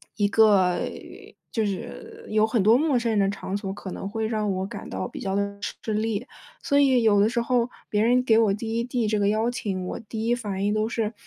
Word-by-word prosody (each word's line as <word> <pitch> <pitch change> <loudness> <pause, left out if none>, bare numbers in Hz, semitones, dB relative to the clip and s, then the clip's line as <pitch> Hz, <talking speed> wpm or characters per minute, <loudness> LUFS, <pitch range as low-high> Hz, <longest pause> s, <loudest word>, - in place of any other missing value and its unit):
一 205 -2 +2
个， 200 -4 +4 0.7
就 225 - 0
是 440 - -6
有 215 0 +3
很 220 -2 +1
多 220 +3 +6
陌 285 0 +2
生 235 -1 0
人 215 - +2
的 195 -1 +3
场 200 -1 -4
所， 200 -2 -3
可 195 -1 -7
能 195 - -5
会 220 +1 -2
让 215 -2 -1
我 190 0 -2
感 195 - -8
到 - - -3
比 - - -9
较 195 0 -2
地 200 0 -2 0.2
吃 220 - -2
力。 220 +1 -1 0.4
所 285 -3 +3
以 260 -4 +4
有 210 -2 +4
的 205 +2 +4
时 240 0 -1
候 240 0 +1 0.2
别 210 - +2
人 250 +2 +3
给 230 -3 +4
我 220 -3 +3
第 225 +2 -3
一 - - 0
递 240 -2 -1
这 210 0 +1
个 200 - +2
邀 220 +3 +1
请， 195 -6 -3
我 - - -5
第 220 0 -5
一 240 - +3
反 205 -5 -3
应 205 - +1
都 215 +1 0
是： 225 -1 -2
220 Hz, 260 characters per minute, -25 LUFS, 200-235 Hz, 0.7 s, 多